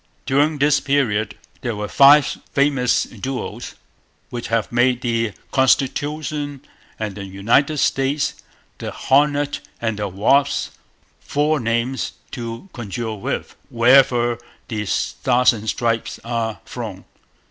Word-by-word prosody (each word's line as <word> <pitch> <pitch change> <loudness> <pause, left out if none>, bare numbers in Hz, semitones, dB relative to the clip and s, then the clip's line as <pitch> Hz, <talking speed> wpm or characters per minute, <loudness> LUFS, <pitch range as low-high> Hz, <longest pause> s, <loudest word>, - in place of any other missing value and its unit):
During 145 +3 +2
this 145 +1 +3
period 115 -7 0 0.3
there 120 -2 -2
were 105 0 -4
five 140 +5 +7 0.3
famous 140 -3 +2
duels, 125 +3 -6 0.6
which 120 -1 -4
have 115 -2 0
made 125 +1 +2
the 115 -3 0 0.2
Constitution 145 +1 0 0.3
and 105 -2 -3
the 100 0 -7
United 115 +11 +1
States, 135 +1 +1 0.5
the - - -4
Hornet 145 +1 +1 0.2
and 115 -2 -2
the 105 - -1
Wasp, 125 +9 +1 0.5
four 150 +1 0
names 120 +2 -1 0.2
to 115 +7 -6
conjure 115 0 -4
with 100 - -4
wherever 120 -1 +4 0.3
the 105 -3 -3
Stars 125 +4 +2
and 110 -1 -5
Stripes 115 0 -1
are 115 -2 -3
flown. 105 -6 -7
120 Hz, 115 wpm, -21 LUFS, 115-140 Hz, 0.6 s, five